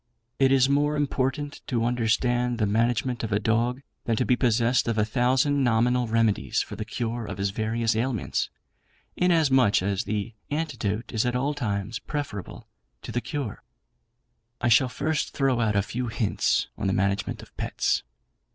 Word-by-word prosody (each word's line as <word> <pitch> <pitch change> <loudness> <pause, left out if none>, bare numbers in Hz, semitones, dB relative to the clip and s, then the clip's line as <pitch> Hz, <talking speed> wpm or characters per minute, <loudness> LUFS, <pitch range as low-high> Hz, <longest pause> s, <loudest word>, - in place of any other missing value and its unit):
"It 135 -1 +4
is 135 -1 +5
more 145 +2 +2
important 145 0 -1
to 115 -3 0
understand 120 +1 +1
the 110 - +1
management 115 +3 0
of 110 - -3
a 100 - +3
dog, 120 +5 0 0.2
than 115 - +1
to 125 - +1
be 125 - +3
possessed 120 0 +2
of 115 -1 0
a 105 - +3
thousand 130 +5 +2
nominal 120 +1 +2
remedies 110 -2 +1
for - - -3
the 110 +1 -5
cure 115 +1 -3
of - - -5
his 100 0 -1
various 110 +2 0
ailments; 115 -2 -1 0.7
inasmuch 135 - +3
as 100 0 -1
the 105 +2 -3 0.2
antidote 125 -9 -2
is 110 - +2
at 125 0 -1
all 135 +4 0
times 110 -5 -3
preferable 145 -10 -5 0.4
to - - -6
the 120 - -1
cure. 140 -8 -4 1.0
"I 120 - +1
shall 125 +3 +5
first 150 +5 -2
throw 135 -3 +2
out 110 -3 +1
a 100 - +3
few 120 +4 -3
hints 110 -2 +1
on - - -1
the 95 - +1
Management 100 +1 -1
of - - -17
Pets. - - 0
120 Hz, 170 wpm, -26 LUFS, 110-130 Hz, 1.0 s, is